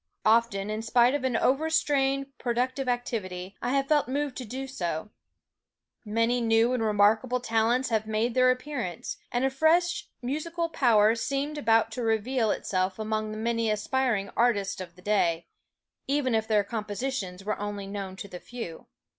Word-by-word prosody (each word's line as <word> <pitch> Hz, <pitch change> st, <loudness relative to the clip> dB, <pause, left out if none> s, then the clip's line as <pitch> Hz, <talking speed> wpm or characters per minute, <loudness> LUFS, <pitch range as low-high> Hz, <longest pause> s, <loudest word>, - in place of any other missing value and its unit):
Often 215 Hz, -2 st, +3 dB
in 215 Hz, +1 st, -2 dB
spite 240 Hz, +2 st, +4 dB
of 290 Hz, -2 st, -1 dB
an 255 Hz, -3 st, +1 dB
overstrained 275 Hz, -2 st, +1 dB
productive 255 Hz, +2 st, -1 dB
activity, 195 Hz, -6 st, -3 dB
I 245 Hz, -, -1 dB
have 275 Hz, 0 st, +1 dB
felt 295 Hz, -3 st, +3 dB
moved 280 Hz, 0 st, -2 dB
to 255 Hz, -, -5 dB
do 260 Hz, +5 st, -5 dB
so; 180 Hz, -, -4 dB, 0.9 s
many 230 Hz, +3 st, +1 dB
new 225 Hz, +1 st, +3 dB
and 250 Hz, -, 0 dB
remarkable 220 Hz, +4 st, +3 dB
talents 235 Hz, +1 st, +1 dB
have 220 Hz, -2 st, 0 dB
made 220 Hz, +2 st, 0 dB
their 255 Hz, +1 st, +5 dB
appearance, 255 Hz, -, -3 dB
and 245 Hz, +2 st, +1 dB
a 270 Hz, -, +1 dB
fresh 345 Hz, +5 st, +2 dB
musical 330 Hz, +6 st, -2 dB
power 225 Hz, -8 st, +4 dB
seemed 275 Hz, +5 st, -2 dB
about 225 Hz, -3 st, +3 dB
to 250 Hz, -, -4 dB
reveal 225 Hz, +1 st, +1 dB
itself 185 Hz, -1 st, -1 dB
among 215 Hz, 0 st, -2 dB
the 215 Hz, -, -5 dB
many 230 Hz, 0 st, 0 dB
aspiring 215 Hz, -1 st, 0 dB
artists 200 Hz, -5 st, +1 dB
of 170 Hz, -2 st, -9 dB
the 180 Hz, -, -17 dB
day, 175 Hz, -5 st, +1 dB, 0.6 s
even 275 Hz, -3 st, +1 dB
if 220 Hz, 0 st, +1 dB
their 210 Hz, -2 st, +3 dB
compositions 210 Hz, -3 st, -4 dB
were 215 Hz, -, -2 dB
only 205 Hz, -1 st, -4 dB
known 195 Hz, -1 st, -5 dB
to 200 Hz, -, -8 dB
the 180 Hz, -2 st, -8 dB
few. 225 Hz, -9 st, -8 dB
230 Hz, 165 wpm, -27 LUFS, 210-260 Hz, 0.9 s, their